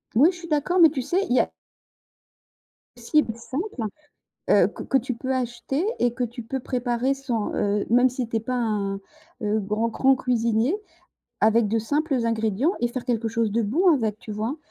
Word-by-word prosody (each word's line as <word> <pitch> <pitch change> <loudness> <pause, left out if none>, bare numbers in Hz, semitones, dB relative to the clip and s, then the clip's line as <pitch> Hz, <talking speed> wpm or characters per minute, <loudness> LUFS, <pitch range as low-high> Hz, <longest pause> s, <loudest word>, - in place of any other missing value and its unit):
Oui, 290 +9 +6
je 355 - -11
suis 335 - -9
d'accord, 305 +5 +1
mais 325 -2 +8
tu 275 -3 -3
sais, 370 +10 0
il 245 - +2
y - - +5
a - - +1 1.5
Cible 240 0 +1
simple, 265 - -4 0.7
heu, - - +5
que - - -9
que 270 - +1
tu 255 0 0
peux 260 +3 -3
acheter 255 +5 -2
et 240 -1 +2
que 250 - -1
tu 240 0 -7
peux 265 +4 -4
préparer 245 0 -1
sans, 255 -6 -2
heu, 205 0 0
même 245 +2 +5
si 255 -1 -3
tu 225 - -3
es - - +1
pas 255 +4 -3
un, 210 -5 -1 0.5
heu, 210 +1 +1
grand, 210 +3 -1
grand 265 +3 +3
cuisinier 235 - +1 0.7
avec 220 0 +4
de 225 +2 +1
simples 290 +7 0
ingrédients 225 - +1
et 240 - +2
faire 245 +1 -5
quelque 235 -2 0
chose 225 -1 0
de 230 +2 +1
bon 300 - +2
avec, 220 -6 -1
tu 215 - -10
vois? 220 +7 -3
240 Hz, 195 wpm, -24 LUFS, 225-270 Hz, 1.5 s, mais